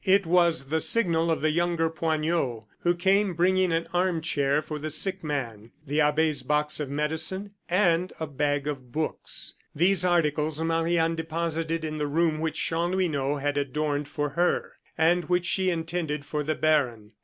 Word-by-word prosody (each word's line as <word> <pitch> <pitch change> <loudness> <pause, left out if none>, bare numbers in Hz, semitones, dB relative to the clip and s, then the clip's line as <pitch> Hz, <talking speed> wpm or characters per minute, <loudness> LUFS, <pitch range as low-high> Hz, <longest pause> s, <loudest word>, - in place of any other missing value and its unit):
It 195 0 +4
was 170 -5 +2
the 160 +1 +1
signal 170 -5 +2
of 165 - 0
the 155 +1 +2
younger 170 0 +1
Poignot, 160 -6 -1 0.2
who 175 0 +1
came 190 +1 +2
bringing 185 +1 +2
an 165 0 0
arm 180 -1 +1
chair 145 -3 +1
for 155 0 -5
the 155 +1 -4
sick 190 +4 -1
man, 120 -7 -4
the 150 +2 +1
abbe's 150 -1 +2
box 150 +3 +1
of 145 -3 -3
medicine, 160 +7 -1 0.2
and 180 -1 +2
a 160 - -2
bag 145 -1 -1
of 135 -4 -5
books. 155 +3 -3 0.2
These 180 +3 +3
articles 155 -3 +1
Marie 165 +1 +1
Anne 165 0 +2
deposited 165 0 -2
in 155 0 -4
the 150 - -1
room 155 +1 +1
which 160 0 -2
Chanlouineau 165 -5 0
had 145 0 -1
adorned 145 +1 -2
for 145 0 -2
her, 175 +5 0 0.3
and 170 +1 +3
which 180 +1 +1
she 190 0 +1
intended 165 -3 -2
for 150 +1 -2
the 155 +1 -1
baron. 125 -9 +1
160 Hz, 170 wpm, -26 LUFS, 150-175 Hz, 0.3 s, It